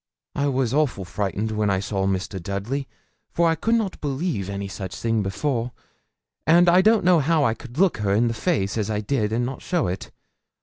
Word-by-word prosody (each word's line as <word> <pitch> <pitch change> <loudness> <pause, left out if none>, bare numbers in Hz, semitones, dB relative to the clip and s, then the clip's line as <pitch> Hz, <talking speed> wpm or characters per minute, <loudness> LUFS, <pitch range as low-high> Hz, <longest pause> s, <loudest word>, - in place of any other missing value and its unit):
'I 145 0 0
was 130 -3 0
awful 140 -10 +1
frightened 105 +3 -2
when 105 -1 0
I 95 -1 +1
saw 95 -1 -1
Mr. 95 0 -2
Dudley, 105 +10 -3 0.4
for 170 0 +2
I 165 - +3
could 225 +9 +1
not 215 -5 -2
believe 140 - -2
any 100 0 -4
such 95 -1 -6
thing 115 -1 0
before, 120 +4 -2 0.7
and 170 +2 +6
I 175 +2 +6
don't 215 -1 +4
know 180 -2 +6
how 155 +1 +2
I 115 - +2
could 120 +2 -12
look 190 0 +3
her 105 -2 -1
in 110 +4 +3
the 115 - 0
face 110 - -1
as 105 0 -1
I 105 -1 -1
did 105 -1 -1
and 120 +2 0
not 130 +1 -5
show 175 -4 0
it. 90 +2 -4
115 Hz, 210 wpm, -23 LUFS, 100-155 Hz, 0.7 s, and